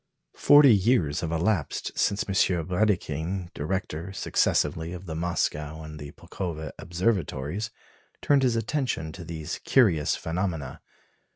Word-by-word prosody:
Forty 145 -4 +7
years 95 - +2
have 80 - -3
elapsed 85 0 -1
since 100 - +1
M. 100 - -2 0.3
Brédikhine, 90 -2 -1
director 90 +1 -3
successively 85 -3 0
of 90 +1 -8
the 80 - -5
Moscow 80 -2 -2
and 80 0 -8
of - - -9
the 75 -1 -7
Pulkowa 85 -4 -6
Observatories, 90 0 -1 0.5
turned 140 -1 +3
his 125 -3 +2
attention 115 - -1
to 90 +2 -9
these 80 -2 -5
curious 95 - +3
phenomena. 85 -3 -3
85 Hz, 125 wpm, -26 LUFS, 80-100 Hz, 0.5 s, Forty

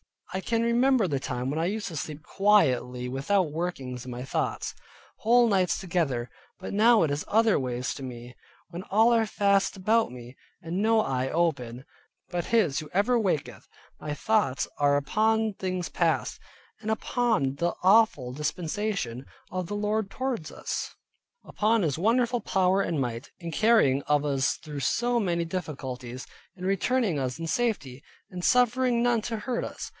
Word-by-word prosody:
I 190 - -1
can 230 +4 0
remember 240 -1 +3
the 140 -2 0
time 125 -1 -3
when 150 +3 -2
I 165 - +1
used 205 +3 -2
to 165 - -6
sleep 150 +3 -6
quietly 130 -13 +2
without 150 +6 0
workings 135 -7 -4
in 130 - -7
my 120 +1 -5
thoughts, 130 - -2 0.5
whole 240 +2 +4
nights 190 -3 +2
together, 145 -10 -1 0.3
but 185 - -7
now 220 +1 +5
it 155 - 0
is 145 +1 -2
other 220 -3 +3
ways 125 -1 -2
with 135 - -7
me. 120 0 -9 0.3
When 170 +1 -6
all 225 +5 +4
are 225 -1 +3
fast 200 -2 +1
about 220 +4 +2
me, 125 +1 -11 0.2
and 175 +3 -3
no 220 +1 +4
eye 130 -5 -1
open, 135 -8 -1 0.5
but 175 -1 -2
His 200 -12 +2
who 155 - -8
ever 225 +6 +3
waketh, 145 - -2 0.3
my 150 - -4
thoughts 205 -5 +1
are 145 -1 +3
upon 220 +9 +1
things 185 -2 -3
past, - - 0 0.4
upon 220 - 0
the 170 +4 0
awful 190 - +4
dispensation 155 - -3 0.3
of 185 -1 -3
the 205 - -4
Lord 210 0 -1
towards 255 -12 -3
us, - - -5 0.5
upon 220 0 +1
His 150 -4 0
wonderful 240 +4 +2
power 190 -2 +2
and 170 -5 -1
might, 120 -1 -4
in 170 -2 -6
carrying 190 - +4
of 150 -1 +2
us 135 -3 +1
through 150 -2 -8
so 240 - +1
many 175 -5 0
difficulties, 130 -8 -5 0.3
in 185 -1 -7
returning 195 - +1
us 130 0 -2
in 165 0 -5
safety, 160 - -1 0.3
and 180 -1 -6
suffering 250 -1 +3
none 240 -2 +2
to 230 - -3
hurt 235 +3 -2
us. - - -7
180 Hz, 165 wpm, -27 LUFS, 140-220 Hz, 0.5 s, now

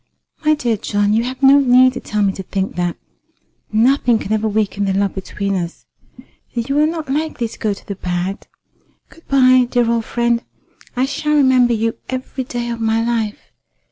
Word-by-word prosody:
"My 310 0 +4
dear 240 -7 -1
John, 205 +1 0
you 225 +2 +2
have 260 +2 -6
no 275 +1 +7
need 255 -1 +5
to - - -5
tell 210 -1 -2
me 195 -1 +1
to 190 - -6
think 190 +1 -3
that. 175 -1 -2 0.7
Nothing 240 +2 +3
can 215 -1 -3
ever 220 0 0
weaken 205 -1 -1
the 195 - 0
love 200 0 0
between 200 +1 -4
us. 175 -2 -4 0.7
And 235 0 -2
you 280 +1 +1
are 305 - +4
not 320 -2 -4
likely 285 -3 -2
to - - -13
go 215 - 0
to 200 - -7
the 200 - -4
bad. 180 0 -4 0.6
Good 330 - -20
bye, 255 -2 +5
dear 245 -2 +2
old 230 -1 0
friend. 235 -1 0 0.5
I 255 +1 +1
shall 300 +2 -1
remember 260 -4 +4
you 225 +1 -1
every 260 0 -4
day 240 -1 -4
of 230 -1 -5
my 225 0 +1
life. 225 -3 -3
235 Hz, 195 wpm, -18 LUFS, 205-260 Hz, 0.7 s, no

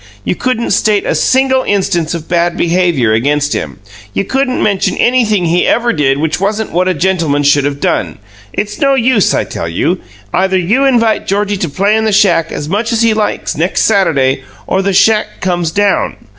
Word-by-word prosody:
You - - -1
couldn't 245 +3 -2
state 205 +1 +1
a - - 0
single 265 0 +2
instance 190 -5 -1
of 165 -1 -7
bad 170 0 0
behaviour 170 -10 +1
against 145 +5 0
him. - - -4 0.4
You - - 0
couldn't 265 +1 -1
mention 200 -2 0
anything 220 -7 +2
he 170 +2 +1
ever 240 0 +1
did 135 -3 +1
which 160 +3 -2
wasn't 210 +2 -1
what 180 +2 0
a 185 - 0
gentleman 165 -4 0
should 145 0 +3
have 140 0 -3
done. - - -1 0.3
It's 210 +5 -4
no 275 -3 +2
use, 240 -4 +2
I - - 0
tell 85 - -5
you. 165 - -1 0.3
Either 190 0 +1
you 215 +10 +1
invite 230 -5 +1
Georgie 205 +1 0
to 175 -4 -3
play 200 +8 +1
in 220 0 0
the 220 - +1
shack 175 -5 +2
as 145 - -5
much 215 +7 -1
as 230 0 +1
he 225 -1 +3
likes 215 -1 -2
next 175 +4 0
Saturday, 140 -11 +1 0.2
or 190 - 0
the 200 +1 0
shack 215 +3 +2
comes 175 -3 -1
down." 200 +3 0
190 Hz, 195 wpm, -13 LUFS, 165-220 Hz, 0.4 s, should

